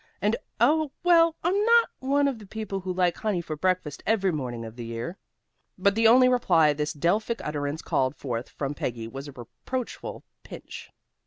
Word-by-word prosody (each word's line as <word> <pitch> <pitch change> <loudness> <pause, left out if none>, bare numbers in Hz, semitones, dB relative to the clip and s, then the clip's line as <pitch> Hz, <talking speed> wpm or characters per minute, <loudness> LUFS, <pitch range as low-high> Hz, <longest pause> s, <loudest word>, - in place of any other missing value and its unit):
"And 210 +3 +1 0.2
Oh, 310 -1 +3
well, 335 -2 +5
I'm 385 +5 +2
not 465 +1 +5
one 280 +2 +2
of 265 -5 -2
the 210 - -12
people 210 -1 -4
who 185 0 -4
like 180 -2 +1
honey 210 -5 -1
for 165 -2 -5
breakfast 175 -3 -1
every 195 -4 +2
morning 125 -7 -4
of 110 0 -9
the 120 -1 -7
year." 115 +11 -5 0.6
But 200 +1 +3
the 225 +2 +4
only 255 +3 +7
reply 175 -12 +4
this 150 +1 -2
Delphic 210 +10 0
utterance 145 0 -3
called 130 +1 0
forth 125 -4 -4
from 140 0 -4
Peggy 115 -5 -4
was 135 +5 -8
a - - -8
reproachful 130 - -6 0.2
pinch. - - -10
185 Hz, 180 wpm, -26 LUFS, 145-235 Hz, 0.6 s, only